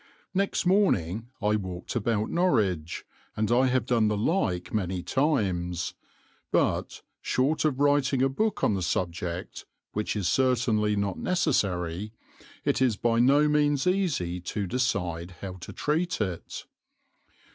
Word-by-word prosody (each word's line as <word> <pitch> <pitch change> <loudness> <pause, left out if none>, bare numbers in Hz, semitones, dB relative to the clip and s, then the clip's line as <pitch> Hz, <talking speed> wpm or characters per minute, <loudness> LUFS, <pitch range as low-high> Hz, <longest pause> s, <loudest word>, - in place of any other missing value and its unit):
Next 195 0 0
morning 115 - +2
I 105 +1 +3
walked 95 0 -6
about 110 -2 0
Norwich, 105 - +1 0.3
and 110 +1 0
I 130 +2 +4
have 130 -2 +1
done 115 -3 +2
the 105 0 0
like 100 - 0
many 95 -4 -1
times, 95 - 0 0.6
but, - - 0 0.2
short 145 +5 +1
of 140 -4 +1
writing 145 -2 +3
a - - +5
book 215 +11 -1
on - - +3
the 95 - -1
subject, 85 0 -3 0.3
which 105 +1 -2
is 100 -4 -1
certainly 115 -2 +2
not 100 -2 -1
necessary, 100 - 0 0.5
it - - +1
is 125 -6 +3
by 115 +1 +1
no 140 +5 +5
means 145 -2 +2
easy 170 - 0
to 100 +3 -3
decide 90 -7 -2
how 95 -2 -6
to 85 - -9
treat 165 +4 -1
it. 95 -6 -4
110 Hz, 135 wpm, -27 LUFS, 90-140 Hz, 0.6 s, a